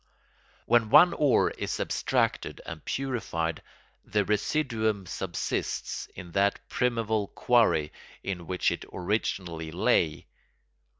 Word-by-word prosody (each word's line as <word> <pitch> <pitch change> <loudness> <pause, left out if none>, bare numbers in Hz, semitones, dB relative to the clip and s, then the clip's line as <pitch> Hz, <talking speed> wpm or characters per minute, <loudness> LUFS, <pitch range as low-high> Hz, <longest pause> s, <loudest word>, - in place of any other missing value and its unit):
When 115 -2 +3
one 175 +9 +8
ore 145 -4 +3
is - - -4
abstracted - - 0
and 80 -2 -7
purified, 115 - -2 0.4
the 105 -1 0
residuum 110 -2 0
subsists 85 0 -3
in 90 -1 -9
that 100 +3 +2
primeval 115 -4 0
quarry 110 -13 +2 0.3
in 90 -4 -4
which 90 -2 +1
it - - -4
originally 90 -4 -2
lay. 80 -3 +1
100 Hz, 105 wpm, -28 LUFS, 85-115 Hz, 0.4 s, one